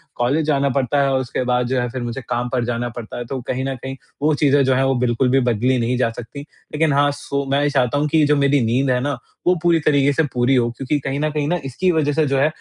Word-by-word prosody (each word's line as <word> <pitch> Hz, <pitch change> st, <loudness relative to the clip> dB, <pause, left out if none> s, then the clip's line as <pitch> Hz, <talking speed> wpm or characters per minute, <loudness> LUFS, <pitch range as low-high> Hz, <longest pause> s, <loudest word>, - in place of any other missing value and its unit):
College 135 Hz, +6 st, 0 dB
जाना 140 Hz, -2 st, +1 dB
पड़ता 135 Hz, +2 st, +1 dB
है 140 Hz, -, +2 dB
और 130 Hz, -, +2 dB
उसके 130 Hz, 0 st, -3 dB
बाद 125 Hz, 0 st, +1 dB
जो 130 Hz, +1 st, 0 dB
है, 125 Hz, -, -1 dB
फिर 130 Hz, +2 st, -5 dB
मुझे 120 Hz, +3 st, -4 dB
काम 120 Hz, 0 st, -1 dB
पर 125 Hz, -1 st, -1 dB
जाना 120 Hz, 0 st, -2 dB
पड़ता 115 Hz, -2 st, -8 dB
है, 120 Hz, -, -5 dB
तो 130 Hz, +3 st, -4 dB
कहीं 130 Hz, +1 st, -2 dB
न 135 Hz, 0 st, -2 dB
कहीं 130 Hz, +1 st, -7 dB, 0.3 s
वो 155 Hz, +1 st, +2 dB
चीज़ें 145 Hz, -1 st, +3 dB
जो 130 Hz, -, +3 dB
हैं, 135 Hz, -, +2 dB
वो 135 Hz, 0 st, +1 dB
बिल्कुल 120 Hz, +2 st, +1 dB
भी 135 Hz, +2 st, +3 dB
बदली 125 Hz, +1 st, +1 dB
नहीं 120 Hz, +2 st, 0 dB
जा 125 Hz, -, +2 dB
सकती। 115 Hz, +4 st, -9 dB
लेकिन 150 Hz, 0 st, -3 dB
हाँ, 145 Hz, +1 st, +3 dB
सो 140 Hz, 0 st, -4 dB
मैं 140 Hz, +1 st, +2 dB
ये 145 Hz, -, +2 dB
चाहता 135 Hz, -2 st, +1 dB
हूँ 150 Hz, +1 st, +1 dB
कि 160 Hz, -, +2 dB
ये 155 Hz, -, +4 dB
जो 150 Hz, 0 st, +3 dB
मेरी 140 Hz, -1 st, +2 dB
नींद 130 Hz, +4 st, +1 dB
है 125 Hz, -1 st, +2 dB
ना, 140 Hz, 0 st, -2 dB, 0.3 s
वो 180 Hz, -, +5 dB
पूरी 170 Hz, -1 st, +3 dB
तरीके 145 Hz, -2 st, +2 dB
से 160 Hz, -, +2 dB
पूरी 125 Hz, +2 st, +2 dB
हो, 120 Hz, -2 st, +2 dB
क्योंकि 145 Hz, +2 st, -1 dB
कहीं 140 Hz, 0 st, -3 dB
न 155 Hz, +1 st, 0 dB
कहीं 150 Hz, -1 st, -2 dB
न, 170 Hz, -, 0 dB
इसकी 180 Hz, +8 st, 0 dB
वज़ह 155 Hz, -3 st, +1 dB
से 155 Hz, +1 st, +2 dB
जो 135 Hz, 0 st, 0 dB
है, 140 Hz, -, +3 dB
135 Hz, 290 wpm, -20 LUFS, 125-145 Hz, 0.3 s, वो